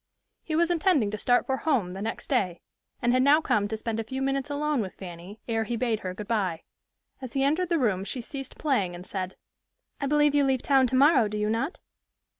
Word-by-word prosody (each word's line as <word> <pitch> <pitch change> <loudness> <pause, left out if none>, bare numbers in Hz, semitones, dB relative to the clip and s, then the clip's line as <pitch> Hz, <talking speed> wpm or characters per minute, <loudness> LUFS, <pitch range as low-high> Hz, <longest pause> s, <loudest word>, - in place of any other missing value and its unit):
He 315 - -3
was 340 +2 +3
intending 315 - +2
to 215 - -3
start 245 +3 +3
for 265 - -1
home 245 - 0
the 190 - -6
next 225 +2 -4
day, 190 - 0 0.4
and 240 0 +3
had 255 - +4
now 285 +3 +6
come 210 -9 +1
to 220 +1 -3
spend 225 0 -3
a - - -1
few 260 +4 -5
minutes 275 +1 -1
alone 290 -2 0
with 190 -3 -6
Fanny 180 +3 -10
ere 225 -1 0
he 235 - -2
bade 230 -2 0
her 185 -2 -5
good 210 +1 -7
by. 190 -8 -1 0.6
As 260 -2 -6
he 270 - +1
entered 325 +6 +1
the 340 - +2
room 210 -9 +1
she 205 +6 -4
ceased 270 +3 -7
playing, 205 - 0
and 175 +1 -9
said, 185 -2 -4 0.6
"I 280 - -1
believe 295 0 +3
you 290 -1 +4
leave 265 -2 +1
town 270 -2 +4
tomorrow, 260 -1 +5
do 210 +1 -4
you 210 0 0
not?" 270 - -1
245 Hz, 230 wpm, -27 LUFS, 210-280 Hz, 0.6 s, now